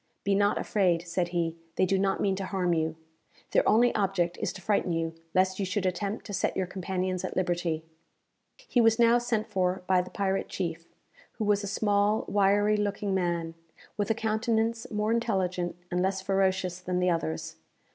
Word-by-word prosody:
"Be 200 - +1
not 205 +1 +3
afraid," 180 -4 +1
said 175 +1 0
he; 170 -2 -1 0.2
"they - - +3
do 190 +1 +1
not 195 0 +1
mean 195 -1 +1
to 195 - -3
harm 185 -3 0
you. 160 -1 0 0.6
Their - - +3
only 240 +2 +4
object 190 -4 0
is - - 0
to - - -9
frighten 195 -1 0
you, 165 0 -1 0.2
lest 185 +1 +2
you - - 0
should 195 0 -1
attempt 195 +3 -2
to 205 - -7
set - - -1
your 190 - +1
companions 185 0 -3
at 185 - -4
liberty." 175 -3 -1 0.8
He 245 - +3
was 225 -1 +4
now 235 0 +5
sent 235 -3 -1
for 185 -4 -1
by 185 -1 +3
the 180 - -8
pirate 195 -1 -1
chief, 165 -2 -4 0.5
who 220 - -3
was 205 0 +2
a - - -3
small 205 +1 +1
wiry 205 +1 +3
looking 205 -1 -1
man, 170 -3 -1 0.4
with 205 +1 -1
a 225 - +2
countenance 225 +1 0
more 210 0 0
intelligent 185 -7 0 0.2
and 180 0 +1
less 190 +1 0
ferocious 190 -2 0
than 180 0 -2
the 180 0 +2
others. 80 - -3
190 Hz, 185 wpm, -28 LUFS, 180-210 Hz, 0.8 s, now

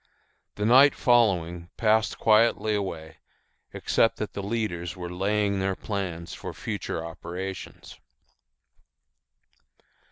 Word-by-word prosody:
The 105 - -2
night 130 +5 +7
following 90 -8 +2
passed 110 -2 +2
quietly 110 -1 +3
away, 80 -6 -4 0.5
except 115 - +1
that 105 - -4
the 100 - -4
leaders 100 -5 -3
were 90 -1 -6
laying 100 +2 0
their 95 0 0
plans 90 -6 -5
for - - -7
future 80 - -4
operations. 90 +3 -7
100 Hz, 100 wpm, -26 LUFS, 85-110 Hz, 0.5 s, night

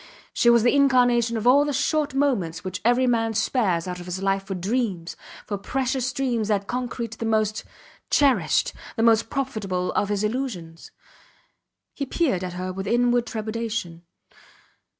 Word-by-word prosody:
She 235 - +3
was 235 -2 +5
the 240 - +4
incarnation 245 -4 +3
of 220 - -4
all 270 +4 +6
the 290 - -1
short 290 +1 0
moments 195 - 0
which 185 0 -5
every 245 +3 +3
man 225 -2 +1
spares 195 -7 +1
out 180 0 -5
of 175 - -9
his 180 +1 -4
life 195 0 +1
for 195 0 -6
dreams, 190 -3 -2 0.3
for 205 -2 -4
precious 260 +3 -1
dreams 250 -6 -1
that 200 -2 0
concrete 240 -1 -4
the 230 - -3
most 215 -1 0 0.5
cherished, 280 -3 +2 0.2
the 225 - 0
most 225 -1 +4
profitable 200 -9 -2
of 205 - 0
his 205 0 -1
illusions. 210 -9 -4 1.0
He 280 - -4
peered 260 - 0
at 180 -1 -4
her 185 +1 -4
with 195 +1 -5
inward 240 +1 +2
trepidation. 220 -6 -4
225 Hz, 160 wpm, -24 LUFS, 195-250 Hz, 1.0 s, all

